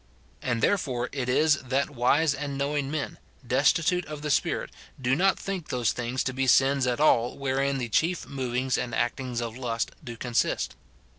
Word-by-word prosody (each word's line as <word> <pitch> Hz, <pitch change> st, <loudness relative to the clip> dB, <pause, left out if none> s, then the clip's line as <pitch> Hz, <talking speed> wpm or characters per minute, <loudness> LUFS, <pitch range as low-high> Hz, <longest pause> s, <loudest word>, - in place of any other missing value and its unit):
And 115 Hz, -2 st, -1 dB
therefore 130 Hz, -11 st, +1 dB
it 125 Hz, -3 st, -3 dB
is 150 Hz, +3 st, +4 dB
that 135 Hz, +3 st, -1 dB
wise 140 Hz, +4 st, +3 dB
and 140 Hz, -1 st, -4 dB
knowing 140 Hz, 0 st, -1 dB
men, 150 Hz, 0 st, -4 dB, 0.3 s
destitute 155 Hz, +8 st, +2 dB
of 150 Hz, -1 st, -7 dB
the 150 Hz, -, -1 dB
Spirit, -, -, 0 dB, 0.3 s
do 130 Hz, 0 st, +2 dB
not 190 Hz, +5 st, +3 dB
think 190 Hz, -5 st, -4 dB
those 120 Hz, -3 st, +1 dB
things 125 Hz, +1 st, -2 dB
to 130 Hz, -, -2 dB
be 135 Hz, 0 st, 0 dB
sins 135 Hz, +1 st, +4 dB
at 125 Hz, +1 st, 0 dB
all 125 Hz, -5 st, +3 dB
wherein 135 Hz, 0 st, 0 dB
the 125 Hz, -2 st, -2 dB
chief 165 Hz, +10 st, +1 dB
movings 130 Hz, -1 st, -1 dB
and 125 Hz, -1 st, -3 dB
actings 120 Hz, +1 st, -1 dB
of 115 Hz, -1 st, -4 dB
lust 120 Hz, -3 st, -2 dB
do 120 Hz, -1 st, -7 dB
consist. 120 Hz, 0 st, 0 dB
135 Hz, 175 wpm, -27 LUFS, 125-145 Hz, 0.3 s, is